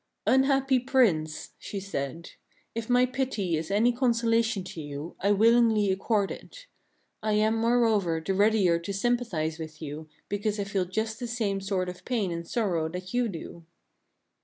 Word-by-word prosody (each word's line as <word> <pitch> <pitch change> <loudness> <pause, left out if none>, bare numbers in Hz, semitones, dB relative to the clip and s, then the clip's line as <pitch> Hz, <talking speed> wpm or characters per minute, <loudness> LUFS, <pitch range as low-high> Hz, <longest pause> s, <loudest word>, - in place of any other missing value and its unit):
"Unhappy 270 0 +3
Prince," 225 - +1
she 200 - -5
said, 170 -4 -5 0.4
"if 230 0 -5
my 250 +1 +5
pity 250 -9 -1
is 160 0 -3
any 220 +5 +3
consola 235 -2 +2
tion 220 -4 -2
to 175 -3 -7
you, 145 +2 -7
I 200 - +2
willingly 220 -1 +4
accord 200 +1 0
it. - - -10 0.6
I 215 0 0
am, 215 +1 +3
moreover, 225 -7 +2
the 175 +4 -2
readier 200 -4 +3
to 170 +4 -5
sympathize 195 -8 -1
with 155 -1 -8
you 155 0 -7 0.2
because 205 +1 -2
I - - +1
feel 195 -2 -1
just 220 +4 -3
the 245 - -4
same 215 -5 -1
sort 190 -2 -1
of 180 0 -7
pain 220 -8 -1
and 170 0 -5
sorrow 175 -9 0
that 180 +3 -7
you 245 -1 +1
do." 170 -2 -8
205 Hz, 165 wpm, -27 LUFS, 175-235 Hz, 0.6 s, my